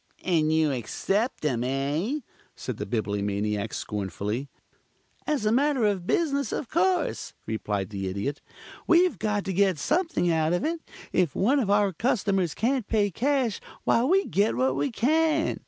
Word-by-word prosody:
"And 160 -4 +2
you 160 -2 +3
accept 195 - -1
them, 125 -6 0
eh?" 145 - -1 0.3
said - - -5
the - - -4
Bibliomaniac 105 0 -1
scornfully. 105 - -3 0.8
"As 295 -8 0
a 215 - +3
matter 270 -1 +2
of 195 -4 0
business, 280 -7 +1
of 255 - -3
course," 350 0 0
replied 105 -3 -3
the 95 -2 -3
Idiot. 100 +10 -3 0.5
"We've 355 +1 +4
got 210 -2 -1
to 195 - -2
get 190 -2 +3
something 330 - +1
out 160 0 +1
of 175 - 0
it. 330 +1 -1 0.3
If 175 -7 +2
one 260 +9 +3
of 220 -7 0
our 205 -1 +3
customers 195 - 0
can't 245 0 0
pay 205 -3 +1
cash, 255 - 0 0.2
why 230 - +3
we 380 +9 +3
get 205 +3 +1
what 130 +1 +1
we 140 +1 0
can. 315 +6 +1
195 Hz, 155 wpm, -26 LUFS, -, 0.8 s, We've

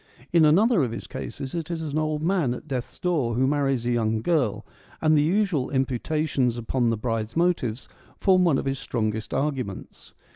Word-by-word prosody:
In 165 -2 +6
another 195 +6 +4
of 125 - 0
his - - -6
cases 130 0 -6
it 165 -2 -4
is 170 -1 -3
an 155 -1 -2
old 155 -1 -1
man 165 -8 +1
at 150 - -11
death's 130 -4 -4
door 150 -10 0
who 130 +2 +2
marries 135 -3 +1
a 120 - +1
young 110 -2 0
girl, 150 - 0 0.3
and 155 -1 +3
the 150 - +5
usual 175 -4 +1
imputations 135 -1 0
upon 120 +1 0
the 115 - 0
bride's 115 +2 -3
motives 150 -9 0 0.3
form 185 -2 +4
one 165 -6 +3
of - - -3
his 135 -1 -1
strongest 110 -4 -2
arguments. 135 -8 -4
135 Hz, 185 wpm, -25 LUFS, 120-160 Hz, 0.3 s, In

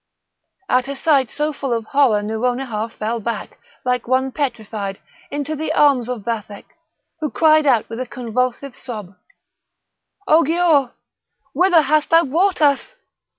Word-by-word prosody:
At 255 -3 +2
a 280 - -4
sight 275 -4 +2
so 300 +4 -2
full 275 -2 -4
of 230 -1 -2
horror 245 -6 +2
Nouronihar 230 0 -2
fell 225 +1 -3
back, 230 +2 -5 0.3
like 250 -1 -1
one 260 +1 +1
petrified, 220 -8 -4 0.3
into 290 +2 -3
the 315 +2 -3
arms 265 -5 +3
of 245 -5 -4
Vathek, 210 -2 -5 0.5
who 305 -2 -2
cried 310 -1 +4
out 240 -5 +3
with 225 +1 -7
a 255 - -4
convulsive 250 +2 -3
sob: 210 -7 -8 1.1
"O 315 +2 +6
Giaour! 320 -4 +2 0.6
whither 350 +1 +4
hast 300 +2 +1
thou 330 +1 +5
brought 340 +4 +1
us? 285 - +1
260 Hz, 145 wpm, -20 LUFS, 230-300 Hz, 1.1 s, O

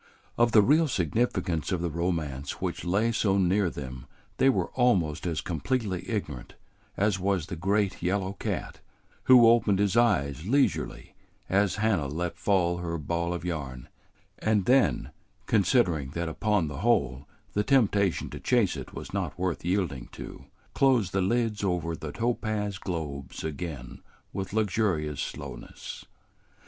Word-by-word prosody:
Of 120 0 +3
the 105 -2 +7
real 155 +7 +4
significance 90 - 0
of 90 -2 -1
the 85 - -1
romance 75 -5 -2
which - - -3
lay 100 +6 +1
so 100 -3 +1
near 95 0 +2
them 65 -3 -8 0.3
they 135 - +5
were 135 - 0
almost 90 - +1
as 80 -3 -1
completely 95 - -2
ignorant 75 - -4 0.4
as 100 -1 +1
was 95 -3 0
the 90 +1 -6
great 100 +3 0
yellow 95 +2 0
cat, 100 - -4 0.5
who 125 -3 +8
opened 115 -4 +4
his 100 0 +1
eyes 85 - +2
leisurely 140 +4 0 0.4
as 95 -1 +2
Hannah 105 -9 +1
let 85 +4 -3
fall 90 -4 +2
her 85 -1 -3
ball 85 +3 -2
of 90 0 -4
yarn, 70 -7 -5 0.5
and 105 -3 +1
then, 130 +3 +3 0.3
considering 95 - +2
that 85 0 -1
upon 105 +1 0
the 75 -2 -6
whole 70 - +1 0.3
the 105 - +1
temptation 100 - +2
to 75 - -7
chase 115 - +2
it - - -8
was - - -8
not - - -2
worth 90 -1 -2
yielding 85 -8 -1
to, - - -9 0.3
closed 125 -8 +3
the 95 - +2
lids 110 +1 0
over 85 -3 -1
the 80 -1 -6
topaz 105 0 -2
globes 75 -7 -5
again 75 -5 -6 0.3
with 95 -1 -4
luxurious 95 -9 0
slowness. - - -7
95 Hz, 145 wpm, -28 LUFS, 80-105 Hz, 0.5 s, who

